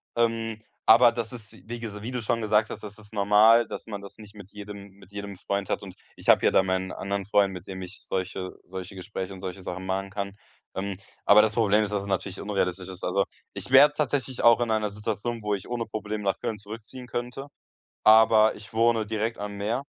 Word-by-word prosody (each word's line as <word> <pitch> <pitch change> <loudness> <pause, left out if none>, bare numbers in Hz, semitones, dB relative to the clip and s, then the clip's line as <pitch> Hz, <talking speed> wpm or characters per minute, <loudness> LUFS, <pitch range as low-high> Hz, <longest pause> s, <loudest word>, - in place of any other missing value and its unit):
Ähm, 115 -1 0 0.2
aber 120 +2 +8
das 115 0 -4
ist, 110 -3 -10
wi 90 - -17
wie 120 0 -5
ges 105 -3 -6
wie 120 - -5
du 125 -2 -3
schon 115 +1 0
gesagt 105 0 +2
hast, - - -7
das 105 -1 -8
ist 105 0 -17
normal, 105 +3 +5
dass - - -7
man 100 -2 -6
das 100 - -10
nicht 105 -1 -13
mit 100 -1 -12
jedem 100 -1 -9
mit 100 -1 -18
jedem 100 -1 -6
Freund 100 +1 -3
hat - - -1
und 95 -2 -9 0.2
ich - - -5
habe - - +6
ja - - +5
da 95 - +4
meinen 95 0 -1
anderen 100 0 -3
Freund, 100 -1 +3
mit 90 - -9
dem 95 -1 -6
ich 90 +3 -9
solche 95 0 -4
solche 95 +1 -8
Gespräche 95 0 -5
und 95 - -10
solche 95 0 -6
Sachen 95 +1 -6
machen 95 +1 -2
kann, 100 0 -5 0.4
ähm, 100 +1 -2 0.3
aber 105 +1 +8
das 110 0 +1
Problem 110 -2 +3
ist, 105 - -3
dass 100 -1 -1
es 100 - -8
natürlich 95 0 -2
unrealistisch 95 -2 -1
ist. 95 -1 -7
Also, 100 0 +1 0.3
ich - - -6
wäre 140 +2 +8
tatsächlich 135 -3 -1
auch 120 0 +7
in 120 -2 0
einer 110 -1 +1
Situation, 105 +3 -4
wo 105 - 0
ich 95 - -8
ohne 120 -2 -2
Probleme 105 -1 -4
nach 95 - 0
Köln 110 - -3
zurückziehen 115 +4 -9
könnte, 125 +4 -5 0.6
aber 110 0 +6
ich 105 0 -13
wohne 115 -1 +3
direkt 110 +2 -2
am 100 0 -5
Meer. 110 +6 -1
105 Hz, 230 wpm, -26 LUFS, 100-115 Hz, 0.6 s, aber